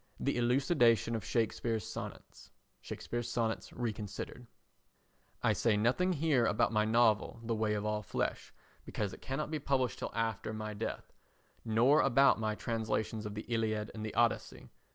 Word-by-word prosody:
The - - 0
elucidation 120 -2 +3
of 110 - -3
Shakespeare's 115 -1 -1
Sonnets. - - -8 0.3
[Shakespeare's 120 -1 -4
Sonnets 115 -2 -1
Reconsidered.] 115 +1 -5 1.0
I - - +4
say 110 -3 +2
nothing 130 - +2
here 145 -6 +2
about 110 +2 +2
my 105 0 +3
novel 110 0 +3
[The 115 0 -1
Way 110 -1 0
of 105 0 -2
All 105 0 0
Flesh] - - -3 0.3
because 105 -3 -3
it - - -11
cannot 140 +3 -3
be 155 - -1
published 130 -5 0
till - - -3
after 110 -1 -1
my 110 0 -4
death; 110 +2 -5 0.5
nor 120 +6 +4
about 135 -1 +5
my 110 -1 -1
translations 110 -1 -2
of 105 - -7
the 105 - -5
Iliad 110 -2 -1
and 110 - -6
the 110 - -5
Odyssey. 120 -1 0
115 Hz, 155 wpm, -33 LUFS, 110-120 Hz, 1.0 s, about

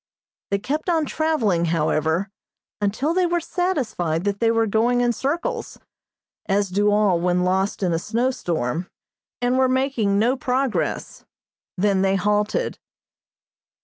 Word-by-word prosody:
They 200 - +1
kept 295 - -3
on 325 -3 +2
traveling, 245 - +1
however, 160 +3 0 0.5
until 220 +10 0
they 365 0 +2
were 345 0 +1
satisfied 265 - -1
that 200 0 -1
they 230 - +3
were 225 0 +2
going 230 +3 +2
in 240 -1 +2
circles, 340 - -3 0.7
as 200 0 +1
do 205 +3 +2
all 205 -4 +3
when 180 +1 +1
lost 190 +2 0
in 175 -2 +1
a 165 - 0
snow 235 +7 0
storm, 170 - -2 0.5
and 250 +1 +2
were 260 -1 +3
making 255 -6 +1
no 235 +5 +3
progress; 260 -1 -2 0.5
then 195 0 +2
they 195 0 +2
halted. 210 - 0
210 Hz, 140 wpm, -22 LUFS, 190-265 Hz, 0.7 s, they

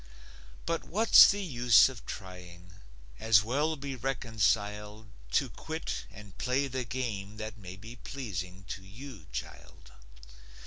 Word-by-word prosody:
But 165 -1 -1
what's 220 +5 +7
the 200 0 0
use 120 - +5
of 130 -4 -9
trying? 90 -2 -9 0.5
As 105 - +5
well 145 +8 0
be 140 -2 -5
reconciled 110 -4 -1 0.2
To - - +3
quit 160 +1 -5
and 105 -3 -13
play 130 +2 +1
the 130 -1 -3
game 110 -4 -4
that 110 0 -6
may 90 -2 -9
Be 115 +5 -11
pleasing 95 - -6
to 95 - -5
you, 105 - -11
child. - - -8
110 Hz, 130 wpm, -30 LUFS, 100-130 Hz, 0.5 s, what's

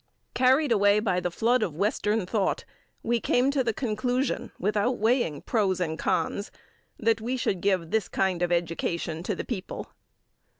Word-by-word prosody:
Carried 260 +3 +3
away 205 -1 +4
by 190 -4 +1
the 180 - -1
flood 235 +7 +2
of 165 -8 -2
western 210 +2 0
thought, 195 +1 -1 0.4
we 235 +1 +1
came 250 +4 +2
to 275 -2 +1
the 235 - +1
conclusion, 245 +2 -1
without 210 +5 0
weighing 220 - +1
pros 195 -6 +1
and 160 -3 -2
cons, 200 - -1 0.5
that 225 0 +1
we 250 +3 -2
should 190 -7 -1
give 185 -5 0
this 220 -4 +1
kind 185 -2 0
of 175 0 +1
education 170 -1 -1
to 195 +3 -2
the - - -5
people. 200 -6 -5
210 Hz, 165 wpm, -27 LUFS, 180-240 Hz, 0.5 s, away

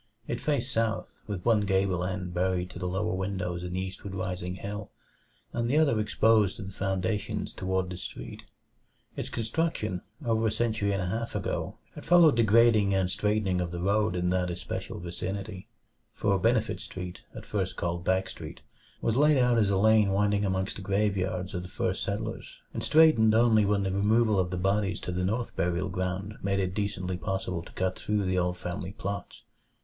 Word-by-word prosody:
It 120 - -3
faced 140 -4 -1
south, 115 0 -1
with 100 -4 -5
one 115 -3 +4
gable 95 -2 +1
end 90 -1 -3
buried 90 0 0
to 90 - -9
the 90 - -2
lower 95 +4 -1
windows 95 -2 -2
in 90 0 -5
the 90 - -1
eastward 95 +1 -6
rising 90 -1 -3
hill, 100 +1 -6 0.6
and 120 0 -1
the 145 - +3
other 140 -8 +4
exposed 110 -1 +3
to 105 - -7
the 95 - -7
foundations 95 +2 -2
toward 95 0 -1
the 90 - -5
street. - - -7 0.7
Its - - -4
construction, 115 - -1 0.2
over 115 -1 +2
a - - +1
century 110 -4 0
and 95 -2 0
a - - -2
half 115 +6 -3
ago, - - -2 0.2
had - - -9
followed 170 -5 +6
the - - +5
grading 110 -2 +5
and 95 -1 +1
straightening 105 -2 +1
of 90 - -2
the 85 0 -5
road 100 +2 +1
in 90 0 0
that 90 -1 +1
especial 90 -1 -5
vicinity; 95 +3 -5 0.4
for 100 -1 +1
Benefit 115 +2 +1
Street 90 -1 -7
at - - -8
first 95 -3 -2
called 85 0 -2
Back 95 +1 +1
Street - - -9 0.4
was 115 - +1
laid 150 +2 +5
out 125 -2 +4
as 105 -2 +3
a 100 - +2
lane 110 0 +5
winding 100 +1 +2
amongst 95 -1 -1
the - - -7
graveyards 95 -2 0
of 90 - -2
the 90 - -8
first - - -2
settlers, 110 +3 -4 0.2
and - - -3
straightened 150 -8 +5
only 110 -2 +5
when 100 0 +2
the 95 - -1
removal 105 +2 +3
of 90 -1 +1
the 90 - -3
bodies 95 +2 +1
to - - -4
the 90 +1 -1
North 110 +6 -1
Burial 90 +2 0
Ground 95 +3 -3
made 100 0 0
it 95 -2 -1
decently 95 -3 -2
possible 95 -2 -2
to 85 - -13
cut 95 0 -1
through 105 -1 0
the 90 0 +1
old 90 0 0
family 90 +2 -5
plots. 100 -1 -5
100 Hz, 195 wpm, -28 LUFS, 90-110 Hz, 0.7 s, followed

